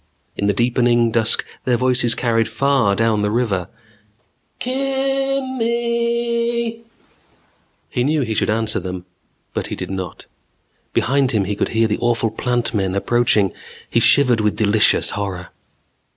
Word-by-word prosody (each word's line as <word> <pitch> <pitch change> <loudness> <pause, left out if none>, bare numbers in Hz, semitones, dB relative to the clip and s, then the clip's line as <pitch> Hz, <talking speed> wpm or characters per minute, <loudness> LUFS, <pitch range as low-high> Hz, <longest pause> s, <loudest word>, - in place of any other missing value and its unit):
In 100 - -1
the 105 - +2
deepening 120 +1 +2
dusk 115 -1 +2 0.2
their 125 -2 +1
voices 125 -2 +2
carried 115 -2 0
far 120 -3 +2
down 115 -1 +1
the 105 - 0
river. 105 -6 -1 0.9
"Kimmmmm 270 0 -1
eeeeeeeeee 235 0 -1 0.6
" - - -41
He 125 - 0
knew 150 +3 +1
he 115 -2 -2
should - - 0
answer 110 0 0
them, 90 -1 -6 0.5
but - - -3
he - - -5
did - - -6
not. 95 -2 -6 0.7
Behind 135 +1 +1
him 105 -3 +2
he 100 +2 -2
could - - -1
hear 115 0 +2
the 105 - -2
awful 120 -2 0
Plant 120 +1 -2
Men 95 -3 -1
approaching. 105 -2 +2 0.4
He 115 - +3
shivered 125 -1 +4
with 105 -1 0
delicious 105 0 +3
horror. 95 -3 -4
120 Hz, 145 wpm, -19 LUFS, 105-155 Hz, 0.9 s, shivered